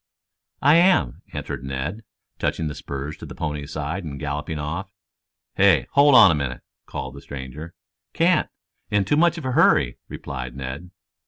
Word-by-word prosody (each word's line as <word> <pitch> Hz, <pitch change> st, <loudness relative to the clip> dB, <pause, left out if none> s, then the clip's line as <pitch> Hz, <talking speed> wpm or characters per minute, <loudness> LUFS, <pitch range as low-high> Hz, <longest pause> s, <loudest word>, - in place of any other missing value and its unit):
"I 145 Hz, +4 st, +7 dB
am," 170 Hz, -, +3 dB
answered -, -, -5 dB
Ned, 65 Hz, +10 st, -4 dB, 0.4 s
touching 80 Hz, -, -1 dB
the 75 Hz, -, -3 dB
spurs 70 Hz, +1 st, -6 dB
to -, -, -9 dB
the -, -, -9 dB
pony's 75 Hz, -2 st, -4 dB
sides 75 Hz, +6 st, -3 dB
and 70 Hz, -4 st, -6 dB
galloping 75 Hz, +3 st, -3 dB
off. 85 Hz, +6 st, -4 dB, 0.7 s
"Hey, 95 Hz, -9 st, +5 dB
hold 140 Hz, -1 st, +6 dB
on 110 Hz, -7 st, +9 dB
a -, -, +3 dB
minute," 70 Hz, -4 st, -3 dB, 0.3 s
called 65 Hz, -2 st, -5 dB
the 70 Hz, -, -10 dB
stranger. 70 Hz, +5 st, -8 dB, 0.4 s
"Can't. -, -, +2 dB, 0.4 s
In 105 Hz, -2 st, +2 dB
too 105 Hz, -, +2 dB
much 170 Hz, +2 st, +3 dB
of 160 Hz, -, -6 dB
a 130 Hz, -, -1 dB
hurry," 80 Hz, -, +3 dB
replied 65 Hz, -2 st, -6 dB
Ned. 70 Hz, +6 st, -6 dB
75 Hz, 165 wpm, -23 LUFS, 70-100 Hz, 0.7 s, on